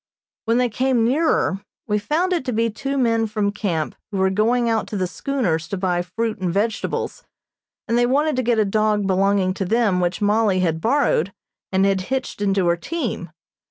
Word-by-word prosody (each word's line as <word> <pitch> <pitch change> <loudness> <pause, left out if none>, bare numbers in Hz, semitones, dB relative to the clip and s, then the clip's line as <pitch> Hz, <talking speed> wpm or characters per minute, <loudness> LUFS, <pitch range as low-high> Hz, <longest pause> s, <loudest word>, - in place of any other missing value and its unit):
When 230 +1 +2
they 250 0 +3
came 250 +1 +1
nearer, 250 - +1 0.2
we 210 0 0
found 325 - 0
it 340 - 0
to 255 - -1
be 230 0 +1
two 275 +6 -3
men 230 -3 +2
from 210 -1 -1
camp 175 -7 -2 0.2
who 205 - -4
were 190 0 +2
going 235 +4 +2
out 225 -1 0
to 210 - -4
the 185 - 0
schooners 175 - -2
to 200 - -4
buy 180 -2 0
fruit 215 +5 -3
and 185 -2 -1
vegetables, 220 - -2 0.6
and 230 - +1
they 240 - +3
wanted 290 +3 +2
to - - +2
get 240 -1 +1
a 215 - +3
dog 210 0 +1
belonging 195 0 +2
to 195 - -3
them 210 -1 +2
which 175 0 -1
Mollie 205 -2 +2
had 165 -2 0
borrowed 230 - +2 0.4
and 190 0 +3
had 195 -1 +2
hitched 265 -5 -3
into 195 -2 +1
her 170 0 +3
team. 335 - -4
215 Hz, 195 wpm, -21 LUFS, 190-240 Hz, 0.6 s, they